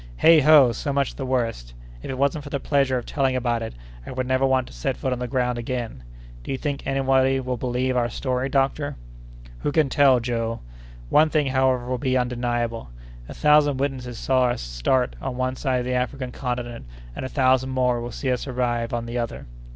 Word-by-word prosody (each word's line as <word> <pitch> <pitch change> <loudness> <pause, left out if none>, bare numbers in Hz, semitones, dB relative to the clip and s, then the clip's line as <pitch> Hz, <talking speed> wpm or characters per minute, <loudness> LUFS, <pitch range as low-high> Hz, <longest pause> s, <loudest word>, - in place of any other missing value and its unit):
"Heigh 165 -1 +7
ho! 145 -4 +7
so 130 +5 -3
much 140 -1 0
the 135 - -5
worse. 115 - -2 0.3
If - - -8
it 130 - -3
wasn't 140 +2 0
for 145 - -8
the 140 - -2
pleasure 135 -2 +1
of 120 - -5
telling 135 -3 0
about 120 -2 0
it, 115 - -6 0.3
I - - -10
would 130 0 -2
never 130 +1 +2
want 130 -1 +2
to - - -14
set - - -2
foot 130 - -1
on 125 - -4
the 125 - -3
ground 125 -1 0
again! 120 - -4 0.4
Do - - -5
you 135 - -1
think 140 -1 -4
anybody 135 -1 +2
will 130 -1 -2
believe 125 +1 -1
our 120 -1 +1
story, 130 +1 -2
doctor?" 140 +1 0 0.6
"Who - - -1
can 150 -2 +2
tell, 135 -3 +5
Joe? 115 -1 -2 0.5
One 155 +1 +5
thing, 150 -2 +1
however, 130 -2 +1
will 125 -1 -2
be 130 0 +1
undeniable: 120 - -2 0.4
a - - -8
thousand 150 -2 +4
witnesses 130 -3 -3
saw 130 +1 +2
us 120 - -1
start - - 0
on 130 -2 -4
one 130 0 -1
side 130 -2 0
of - - -5
the 125 - -1
African 125 0 -2
Continent, 120 - -4 0.3
and - - -5
a 130 - -4
thousand 130 -1 +2
more 125 -2 +1
will 120 - -5
see 130 +3 -2
us 125 +2 -2
arrive 120 -2 -1
on 120 0 -3
the 120 +1 -3
other." 115 -1 -4
130 Hz, 215 wpm, -24 LUFS, 120-135 Hz, 0.6 s, Heigh